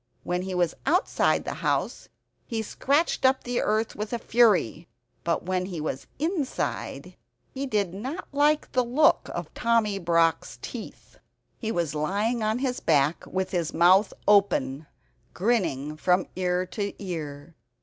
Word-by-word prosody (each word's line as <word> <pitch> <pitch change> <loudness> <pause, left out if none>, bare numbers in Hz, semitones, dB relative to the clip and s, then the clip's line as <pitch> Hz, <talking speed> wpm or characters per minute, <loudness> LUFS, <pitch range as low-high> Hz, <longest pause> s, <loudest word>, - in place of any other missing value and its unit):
When 180 0 -1
he 185 0 -4
was 175 -2 +1
outside 360 +7 +2
the - - -3
house, - - -1 0.4
he 225 -3 -2
scratched 285 +10 0
up 265 0 +3
the 245 0 -1
earth 215 +1 0
with 210 +1 -4
fury. 220 - +3 0.4
But 170 -1 0
when 185 0 -1
he 175 -4 -5
was 150 -3 -4
inside 315 -2 -3 0.4
he 275 +1 -4
did 205 -7 0
not 255 - -5
like 295 +1 +2
the 255 -1 +2
look 270 +6 +3
of - - -5
Tommy 230 -4 +1
Brock's 165 -2 +1
teeth. - - -9 0.4
He 220 -2 -2
was 170 -7 -1
lying 205 +10 0
on 215 +1 +1
his 255 -1 -1
back 150 +1 +1
with 190 0 -2
his 170 -3 -1
mouth 185 +4 +5 0.2
open, 160 -9 +3 0.5
grinning 175 - 0
from 180 +3 +2
ear 180 0 0
to 200 +2 -4
ear. 160 -5 -6
195 Hz, 145 wpm, -26 LUFS, 170-240 Hz, 0.5 s, mouth